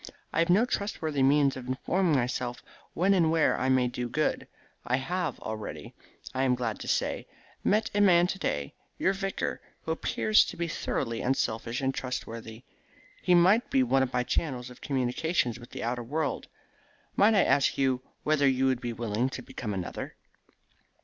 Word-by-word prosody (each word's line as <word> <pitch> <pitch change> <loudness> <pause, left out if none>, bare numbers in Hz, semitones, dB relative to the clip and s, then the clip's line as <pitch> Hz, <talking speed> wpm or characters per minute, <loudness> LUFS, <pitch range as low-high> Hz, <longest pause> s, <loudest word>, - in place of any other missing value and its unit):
I - - +1
have 165 +1 +2
no 200 +7 +5
trustworthy 160 - -2
means 140 0 +4
of 130 -1 -8
informing 165 +6 +1
myself 125 -1 -2 0.3
when 190 +4 +3
and 170 -4 +3
where 160 -1 +3
I 130 - +1
may 130 -1 +3
do 125 0 -4
good. 155 +5 -1 0.4
I 125 - +1
have 175 +7 -2
already, 110 -1 -6 0.4
I 130 - -1
am 130 -1 +3
glad 120 -3 -3
to - - -7
say, - - -1 0.4
met 215 +2 +2
a 205 - +2
man 175 -3 +6
to 190 +2 -3
day, 70 - -2 0.2
your 190 - +2
vicar, 195 0 -3 0.2
who 160 - -3
appears 215 +6 +3
to - - -7
be 170 0 -1
thoroughly 115 -7 -2
unselfish 120 -2 -1
and 135 0 0
trustworthy. 115 -3 -6 0.6
He 180 - +3
shall 185 +6 +6
be 130 - +3
one 130 +2 +3
of 130 -1 0
my 125 -1 +1
channels 125 -3 -2
of 125 - -15
communication 130 +1 0
with 120 - -12
the - - -6
outer 120 +1 -1
world. 145 +6 -2 0.7
Might 215 +2 +5
I 195 - +5
ask 135 +1 +2
you 130 -2 +1 0.2
whether 150 -2 +3
you 130 0 +2
would 130 -2 +1
be 120 -1 -3
willing 115 +2 -1
to 130 - -7
become 115 -2 -6
another?" 95 -3 -5
130 Hz, 180 wpm, -28 LUFS, 125-165 Hz, 0.7 s, man